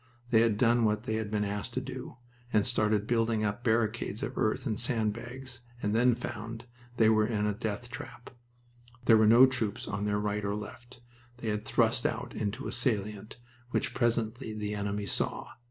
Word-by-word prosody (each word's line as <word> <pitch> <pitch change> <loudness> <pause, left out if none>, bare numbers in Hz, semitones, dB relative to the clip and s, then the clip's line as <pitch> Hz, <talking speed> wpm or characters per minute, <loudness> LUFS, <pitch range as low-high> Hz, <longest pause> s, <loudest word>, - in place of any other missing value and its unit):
They 110 -2 +6
had 115 -3 +3
done 120 +1 +4
what 105 0 +1
they 110 -3 -1
had 110 -2 -3
been 105 -1 0
asked 100 0 -4
to - - +1
do, 130 -1 -7 0.3
and 105 -3 +3
started 110 -3 +2
building 115 -1 +1
up 105 +3 -2
barricades 110 -2 0
of - - -4
earth 110 - 0
and 110 -5 -1
sand 115 -3 +1
bags, 120 +2 -7 0.2
and 105 -2 -1
then 120 +1 +4
found 115 -1 -6 0.3
they 110 - +5
were 110 -1 +4
in 105 -3 0
a 105 - +1
death 110 +3 -4
trap. 125 - -9 0.7
There 115 - +7
were 110 0 +5
no 120 +4 +9
troops 120 -6 -2
on 100 0 -2
their 105 0 +1
right 105 0 -1
or 100 0 -1
left. 120 +4 -9 0.4
They 120 -2 -4
had 105 0 -2
thrust - - +2
out - - -4
into 110 +6 -3
a - - -3
salient, 105 -4 -2 0.3
which - - -1
presently 115 -1 0
the 105 -1 -3
enemy 100 0 -2
saw. 100 - -2
110 Hz, 190 wpm, -30 LUFS, 105-120 Hz, 0.7 s, no